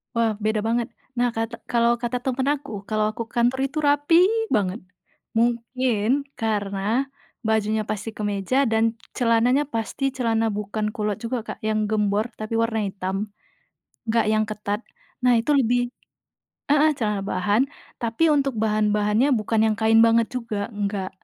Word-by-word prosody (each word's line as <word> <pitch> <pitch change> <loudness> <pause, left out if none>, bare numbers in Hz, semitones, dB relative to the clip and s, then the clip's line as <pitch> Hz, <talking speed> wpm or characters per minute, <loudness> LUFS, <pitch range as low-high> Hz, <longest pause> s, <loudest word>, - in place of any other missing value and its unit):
Wah, 230 -1 +2
beda 215 0 0
banget. 230 +1 0 0.3
Nah, 245 0 +3
kata 225 +1 -3
kalau 235 0 +2
kata 240 +1 -2
temen 265 0 -1
aku, 280 -8 -2
kalau 215 -1 +1
aku 230 - -4
kantor 245 +2 +1
itu 280 - -9
rapi 290 +3 +4 0.4
banget, 200 0 0 0.6
mungkin 235 +1 +1 0.2
karena 215 +3 -1 0.4
bajunya 220 0 +1
pasti 215 +1 -3
kemeja 205 +5 0
dan 225 +1 +2 0.2
celananya 245 +3 +3
pasti 230 +2 -4
celana 225 -3 +1
bukan 210 +1 -2
kulot 210 -1 -1
juga, 235 +2 -2
Kak, - - -6
yang 215 -1 0
gembor 210 +2 0
tapi 215 +1 -5
warna 230 0 +1
hitam, 195 +2 -3 0.8
nggak 230 +1 +2
yang 215 0 +3
ketat. 210 -1 -3 0.4
Nah, 250 -1 +5
itu 235 +6 0
lebih 245 -1 +2 0.8
heeh, 300 +1 +5
celana 210 -4 -1
bahan 205 +4 +1 0.4
tapi 230 +8 +1
untuk 275 -6 +2
bahan-bahannya 210 +3 +2
bukan 215 +1 0
yang 215 - -1
kain 225 0 +5
banget 230 0 +4
juga, 225 -5 -3
nggak. 200 -2 -2
225 Hz, 145 wpm, -24 LUFS, 210-245 Hz, 0.8 s, Nah